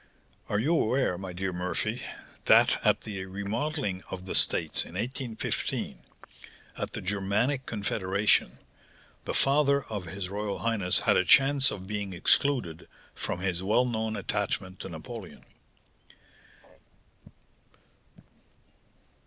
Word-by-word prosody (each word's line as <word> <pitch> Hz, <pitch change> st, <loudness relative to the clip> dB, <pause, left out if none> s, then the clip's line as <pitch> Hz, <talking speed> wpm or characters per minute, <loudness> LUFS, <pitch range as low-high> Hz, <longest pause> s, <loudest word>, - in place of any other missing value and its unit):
Are 105 Hz, -, +1 dB
you 140 Hz, +11 st, +2 dB
aware, 130 Hz, -, +2 dB
my 95 Hz, 0 st, -6 dB
dear 95 Hz, +1 st, -3 dB
Murphy, 90 Hz, +6 st, -2 dB, 0.4 s
that -, -, +5 dB
at -, -, +3 dB
the 100 Hz, -3 st, -5 dB
remodelling 100 Hz, +2 st, -2 dB
of 95 Hz, 0 st, -6 dB
the 95 Hz, -, -4 dB
States -, -, +2 dB
in 85 Hz, -, -11 dB
1815, 120 Hz, +2 st, -3 dB, 0.8 s
at -, -, -4 dB
the -, -, -4 dB
Germanic 105 Hz, +8 st, 0 dB
confederation, 100 Hz, -, +1 dB, 0.7 s
the -, -, -3 dB
father 140 Hz, 0 st, +3 dB
of 105 Hz, -4 st, -5 dB
his 95 Hz, +2 st, -5 dB
royal 100 Hz, +1 st, -3 dB
highness 110 Hz, -6 st, 0 dB
had -, -, +4 dB
a -, -, +4 dB
chance 135 Hz, +7 st, +6 dB
of 95 Hz, -6 st, -6 dB
being 100 Hz, -1 st, -4 dB
excluded, 90 Hz, -, +1 dB, 0.3 s
from 90 Hz, -, -4 dB
his 95 Hz, -2 st, -1 dB
well 110 Hz, +6 st, +3 dB
known 110 Hz, -2 st, -1 dB
attachment 95 Hz, -2 st, -2 dB
to -, -, -6 dB
Napoleon? 95 Hz, +5 st, -9 dB
105 Hz, 120 wpm, -28 LUFS, 95-120 Hz, 0.8 s, chance